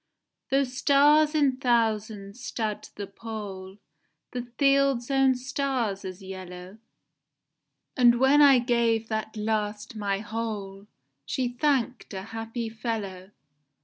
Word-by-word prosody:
Though 275 +1 +3
stars 290 +4 +4
in 280 -4 +3
thousands 220 -3 0
stud 220 -4 -3
the 205 - -5
pole, 200 -2 -8 0.5
The 250 - -3 0.2
fields 275 -3 +3
own 270 -1 +4
stars 250 -6 -2
as 185 0 -7
yellow, 185 +1 -9 1.2
And 240 -2 +5
when 270 +3 +5
I 280 -2 +8
gave 235 -2 +1
that 220 0 -3
last 210 0 -2
my 200 -2 -1
whole, 210 -2 -5 0.4
She 245 - -1
thank'd 250 -3 -1
a 190 - -5
happy 225 +1 -4
fellow. 215 -5 -5
225 Hz, 115 wpm, -27 LUFS, 205-260 Hz, 1.2 s, I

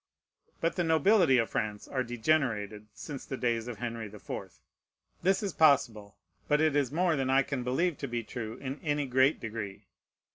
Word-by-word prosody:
But 165 +3 0
the 175 - +2
nobility 165 -2 +4
of 115 -2 +1
France 105 -1 -3
are 130 - -1
degenerated 115 -4 0
since 140 +5 -8
the 135 - -5
days 120 -2 0
of 120 -3 -5
Henry 115 -2 -4
the 105 +1 -11
Fourth. - - -7 0.6
This 190 +3 +2
is 195 -4 -2
possible; 120 -10 +3 0.3
but 150 0 +3
it 155 -2 +2
is 140 -3 +1
more 170 +1 +2
than 135 -2 -1
I 135 +1 +4
can 135 -3 -3
believe 155 +7 0
to 140 - -3
be 120 -1 -3
true 110 0 -6
in 135 +1 -5
any 145 -2 0
great 130 +3 +3
degree. 105 -3 -6
130 Hz, 185 wpm, -30 LUFS, 115-155 Hz, 0.6 s, nobility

